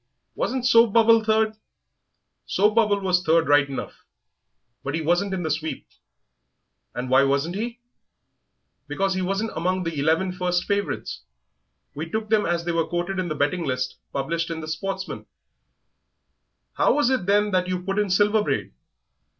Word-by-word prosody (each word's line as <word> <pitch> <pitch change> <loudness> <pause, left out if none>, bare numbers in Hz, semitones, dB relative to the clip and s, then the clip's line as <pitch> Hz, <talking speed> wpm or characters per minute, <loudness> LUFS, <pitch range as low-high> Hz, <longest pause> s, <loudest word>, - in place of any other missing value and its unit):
Wasn't 255 0 -2
Soap 230 -3 +5
bubble 230 -1 +5
third?" 220 0 +2
"Yes, 215 - -21 0.9
Soap 210 +2 +2
bubble 210 -3 +2
was 180 -2 +2
third 165 -1 +3
right 145 -1 +4
enough, 135 - -7 0.8
but 140 +3 -3
he 165 - -1
wasn't 175 +5 +1
in 185 -2 -2
the 160 - -1
sweep." 155 +1 -3 1.1
"And 125 +1 -3
why 130 +2 +5
wasn't 140 +5 0
he?" 235 +3 -4 1.1
"Because 195 0 0
he 185 - -2
wasn't 195 +4 -1
among 185 +2 -1
the 165 -3 -3
eleven 160 +6 +1
first 180 -1 -1
favourites. 200 0 -3 0.7
We 160 +3 -6
took 220 +3 -3
them 215 -1 +3
as 170 0 -1
they 175 - 0
were 165 -1 0
quoted 175 +3 -2
in 185 - -1
the 155 - -3
betting 145 +5 0
list 130 -2 -2
published 165 +5 -2
in 165 -1 -4
the 155 - -7
Sportsman." 190 +5 -5 1.5
"How - - +2
was 290 -3 +2
it, 250 -9 -1
then, 205 +1 +3
that 185 -1 +1
you 180 -1 -3
put 195 +2 -1
in 205 -1 0
Silver 210 +3 +3
Braid?" - - -2
185 Hz, 165 wpm, -24 LUFS, 160-210 Hz, 1.5 s, Soap